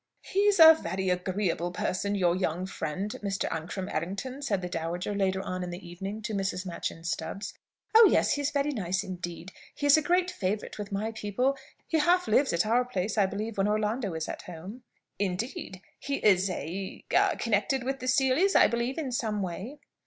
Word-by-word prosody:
"He's 400 0 +2
a 320 0 +11
very 190 - -3
agreeable 180 -1 -1
person, 185 +3 -1
your 175 -3 +2
young 180 -1 -1
friend, 190 +2 -4
Mr. 195 -1 -1
Ancram 175 +4 -4
Errington," 200 - -4
said 200 -10 -1
the - - -2
dowager, 175 +3 -3
later 190 -1 0
on 185 0 -4
in 180 - -4
the 175 +1 -8
evening, 195 +5 -6
to 215 - -3
Mrs. 195 -2 -2
Machyn 170 -2 -5
Stubbs. 170 +4 -4 0.4
"Oh 445 0 +9
yes; - - +3
he's 285 -1 0
very 285 0 0
nice 190 -6 -1
indeed. 175 -1 -6 0.2
He 290 - -3
is 285 +1 +7
a - - +3
great 355 +3 +2
favourite 210 - -3
with 205 0 -5
my 210 +3 -2
people. 225 +5 0 0.3
He 320 - +1
half 355 +4 +3
lives 265 +6 +3
at 170 +3 +1
our 235 +3 +3
place, 205 -4 -2
I 205 -3 +3
believe, 210 +2 -4
when 195 - +3
Orlando 210 -2 0
is 160 0 -3
at - - -5
home." 180 +8 -9 0.4
"Indeed! 190 -1 -3 0.2
He 280 - -2
is 195 -5 +3
a 185 +2 -5
a - - +4
connected 230 +4 0
with 270 +1 -2
the 255 - -5
Seelys, 270 +9 +3
I - - +8
believe, 235 +3 -1
in 290 -5 -3
some 215 -4 -1
way?" 190 - -5
200 Hz, 190 wpm, -28 LUFS, 185-255 Hz, 0.4 s, a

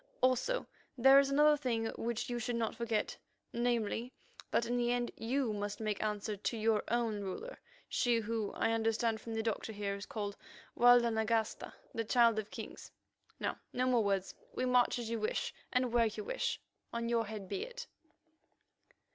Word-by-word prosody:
Also, 255 - +2 0.3
there 270 +3 +8
is 275 0 +2
another 300 +2 +5
thing 245 -6 -1
which 235 0 -2
you 240 -1 -2
should 240 +1 -2
not 230 -1 -1
forget—namely, 235 +1 -2 0.4
that 235 - +2
in 240 +1 -1
the 240 0 +1
end 245 -1 0
you 245 0 0
must 205 0 -3
make 215 -2 -2
answer 210 0 -2
to 210 +3 -2
your 220 -1 +2
own 230 -3 0
ruler, 200 - -6 0.3
she 240 -1 +2
who, 225 -2 -2
I 225 - +1
understand 225 0 +1
from 225 -1 -5
the 225 - -1
doctor 225 0 -2
here, 205 -1 -3
is 200 +1 -6
called 205 -2 -4 0.4
Walda 245 -1 +6
Nagasta, 220 0 -1 0.2
the 230 - -1
Child 230 -1 +4
of 215 - -5
Kings. - - -8 0.5
Now, - - -2
no 250 +1 +1
more 245 -3 +3
words; 195 -2 0 0.2
we 255 - 0
march 250 -1 +3
as 240 -2 -4
you 230 - -1
wish 215 - -1 0.2
and 250 -2 +1
where 235 -1 +5
you 215 -1 -5
wish. - - -2 0.3
On 235 0 -2
your 230 -2 +1
head 210 -3 -6
be 390 - -3
it!" - - -7
230 Hz, 175 wpm, -34 LUFS, 215-245 Hz, 0.5 s, there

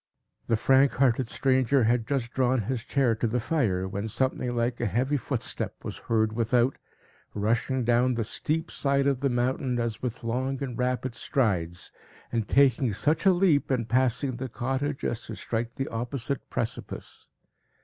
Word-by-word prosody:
The 115 - +3
frank 135 +4 +4
hearted 130 -2 +2
stranger 130 0 +2
had 115 0 +2
just 130 -4 -2
drawn 130 -2 +2
his 120 +2 -3
chair 130 -3 +2
to 115 +1 -1
the 120 +3 0
fire, 110 - 0
when 100 +3 -3
something 125 +1 -1
like 120 +1 0
a 120 - +1
heavy 125 +9 0
footstep 135 - -2
was - - -5
heard 110 -1 +2
without, 120 +3 +2 0.6
rushing 115 +5 0
down 120 +2 +3
the 115 - 0
steep 160 +9 -2
side 140 -1 +1
of 140 -2 +2
the 140 0 +1
mountain, 125 0 0
as 115 -2 -2
with 125 -1 -4
long 130 +4 -2
and 125 -3 -4
rapid 125 0 -1
strides, 90 -10 -1 0.4
and 115 -3 -1
taking 130 -4 +3
such 155 - +1
a - - +8
leap, 175 -5 +3
in 125 -4 0
passing 125 +2 +1
the 130 +1 -4
cottage, 135 +4 -2
as 120 - -1
to - - -6
strike 115 +1 -3
the 135 - -2
opposite 125 +3 -4
precipice. - - -5
125 Hz, 170 wpm, -27 LUFS, 115-135 Hz, 0.6 s, a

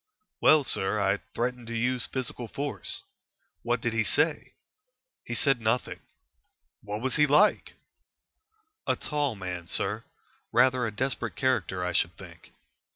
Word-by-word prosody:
"Well, 155 -2 +6
sir, 105 -4 +1
I 100 0 +2 0.2
threatened 125 0 -2
to 115 0 -3
use 125 +1 0
physical 125 -2 -4
force." 145 - -4 0.6
"What - - 0
did - - -1
he - - +2
say?" - - +1 0.7
"He - - -5
said 135 -4 +2
nothing." 110 +3 0 0.8
"What 105 +1 -5
was 130 0 -1
he 150 0 +5
like?" 150 +9 +3 1.1
"A - - +3
tall 145 -5 -1
man, 90 -3 -6
sir. 105 +5 -1 0.5
Rather 130 -2 +4
a - - -3
desperate 130 +5 -3
character, 115 -9 0
I 90 - -2
should 85 -1 +2
think." 85 -3 -13
120 Hz, 140 wpm, -28 LUFS, 100-130 Hz, 1.1 s, Well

